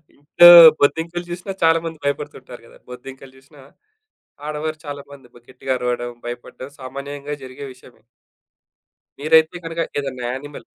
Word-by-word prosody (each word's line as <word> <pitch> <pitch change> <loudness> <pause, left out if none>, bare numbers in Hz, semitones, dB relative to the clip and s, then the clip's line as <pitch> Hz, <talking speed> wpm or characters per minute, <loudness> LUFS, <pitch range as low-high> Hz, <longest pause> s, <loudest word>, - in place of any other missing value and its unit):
ఇంట్లో 150 +4 +5 0.3
బొద్దింకలు 165 +4 0
జూసినా 180 +3 -6
చాలా 165 0 +4
మంది 165 -1 -6
భయపడుతుంటారు 140 -3 -5
గదా! - - -19
బొద్దింకలు 130 +2 -11
జూశినా 140 +2 -20 0.9
ఆడవారు 155 +1 -4
చాలా 145 -1 -7
మంది 135 -3 -15
కొద్ది 120 0 -21
గట్టిగా 130 0 -4
అరవడం, 120 -1 -3 0.2
భయపడ్డం 120 +2 -9
సామాన్యంగా 140 +2 -7
జరిగే 130 +2 -10
విషయమే. 125 -1 -20 1.2
మీరైతే 160 +3 +3
గనక 165 0 -4 0.2
ఏదన్నా 130 -3 -6
యానిమల్. 145 +3 -9
140 Hz, 130 wpm, -20 LUFS, 130-155 Hz, 1.2 s, ఇంట్లో